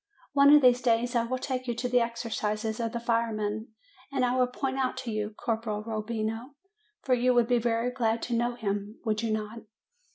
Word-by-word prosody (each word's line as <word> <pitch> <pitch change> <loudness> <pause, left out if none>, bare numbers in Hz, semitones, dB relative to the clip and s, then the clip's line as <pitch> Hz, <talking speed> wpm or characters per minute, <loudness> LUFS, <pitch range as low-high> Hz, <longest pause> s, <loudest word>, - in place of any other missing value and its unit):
One 280 0 +7
of 295 -1 +7
these 250 0 +5
days 240 0 +1
I 235 -1 +2
will 255 +2 -2
take 255 0 -3
you 240 - -1
to 250 +2 -2
the 250 0 +3
exercises 220 -2 -2
of 230 -1 -1
the 235 - -3
firemen, 225 -2 -1 0.4
and 265 -2 +1
I 245 +1 +1
will 255 -1 +3
point 265 +1 -3
out 260 -1 0
to 235 - -3
you 215 -1 -2
Corporal 220 -2 -2
Rob 215 -1 -4
bino; 225 +4 -3 0.5
for 260 - +2
you 250 0 +3
would 240 -1 +4
be 245 -1 +3
very 235 +1 0
glad 230 -2 0
to 245 - -3
know 240 +1 0
him, 205 -1 -3
would 215 -1 0
you 230 -1 -1
not?" 215 +1 -3
235 Hz, 215 wpm, -28 LUFS, 220-250 Hz, 0.5 s, One